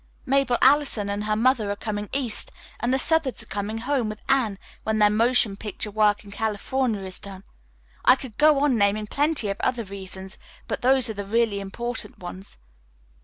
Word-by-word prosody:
Mabel 270 -2 +2
Allison 265 -7 +3
and 205 +1 -3
her 215 0 +1
mother 230 -2 +2
are 205 - -1
coming 205 0 -4
east, 260 -5 -2 0.3
and 240 +2 0
the 265 - +3
Southards 280 -4 +1
are - - -14
coming 210 +1 -4
home 250 -1 -1
with 215 0 -8
Anne 250 -7 +2 0.2
when 220 0 -1
their 210 -1 +5
motion 225 -1 +3
picture 210 +1 -4
work 210 0 +2
in 200 - -12
California 220 +2 -1
is 185 -1 -3
done. 195 -1 -10 0.6
I 255 - +7
could 260 -5 -10
go 300 -2 +5
on 265 -6 +3
naming 205 +1 +2
plenty 285 0 0
of 195 - -2
other 245 -2 0
reasons, 190 -1 -9 0.3
but - - -3
those 260 0 +4
are 220 - -2
the 205 -1 -5
really 220 0 +1
important 210 +2 -4
ones." 185 +2 -9
220 Hz, 185 wpm, -24 LUFS, 205-255 Hz, 0.6 s, I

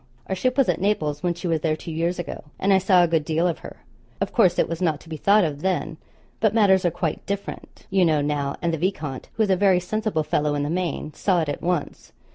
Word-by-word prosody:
Our - - -3
ship 255 +8 0
was 275 - +4
at - - 0
Naples 155 -8 0
when 175 -1 0
she 175 +1 -5
was 165 -2 0
there 155 -1 +1
two 165 - -8
years 170 +3 -1
ago; 175 - -6
and 195 +1 +2
I 190 - +5
saw 185 -1 +4
a - - +3
good 165 -2 +1
deal 160 +3 +1
of 170 - -2
her. - - -12 0.4
Of - - -2
course 185 -7 +4
it - - +2
was 165 +1 -5
not 160 -5 +1
to 165 - -16
be 160 - -4
thought 200 +6 +4
of 150 -3 -2
then; 170 -3 -1 0.4
but 220 0 +2
matters 195 -4 +4
are 175 - +3
quite 160 -1 -3
different, 200 0 -6
you 190 -1 +3
know, 160 -3 +3
now, 145 -1 -1
and 170 -1 +1
the 165 - -2
viscount, 155 -7 -3
who 225 - +2
is 205 - +1
a - - +5
very 190 -1 +4
sensible 205 -2 -1
fellow 150 0 0
in 145 - -1
the 145 - -2
main, 170 -3 -2
saw 180 0 +1
it 155 - -2
at 145 - -4
once. 175 -4 -3
175 Hz, 260 wpm, -23 LUFS, 155-190 Hz, 0.4 s, I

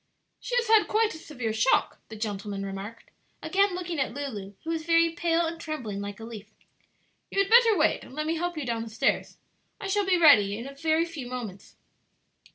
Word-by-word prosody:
"She - - -4
has 485 -1 +1
had 440 -1 +5
quite 435 0 +2
a 320 - -9
severe 250 -9 -4
shock," 225 +4 +2
the 220 - -8
gentleman 205 -2 -4
remarked, 195 +4 -8 0.3
again 395 -1 +2
looking 350 -3 -4
at 265 -2 -1
Lulu, 210 -9 -6
who 325 - -3
was 325 -1 -2
very 335 0 +3
pale 335 0 +1
and 330 0 -5
trembling 235 -11 -5
like 205 +1 -6
a - - -9
leaf. 220 -2 -9 0.8
"You - - -7
had 395 +1 +1
better 460 -3 +7
wait 315 - +2
and 260 - -13
let 305 0 -2
me 320 - 0
help 350 0 -3
you 300 - -3
down 230 -2 -2
the 225 - -6
stairs. 220 +1 -1 0.4
I 415 - -7
shall 405 +1 +1
be 370 -2 +4
ready 210 - +6
in 235 - -6
a 275 - -8
very 315 +3 +1
few 315 -7 -7
moments." 235 -6 -7
300 Hz, 210 wpm, -27 LUFS, 220-340 Hz, 0.8 s, better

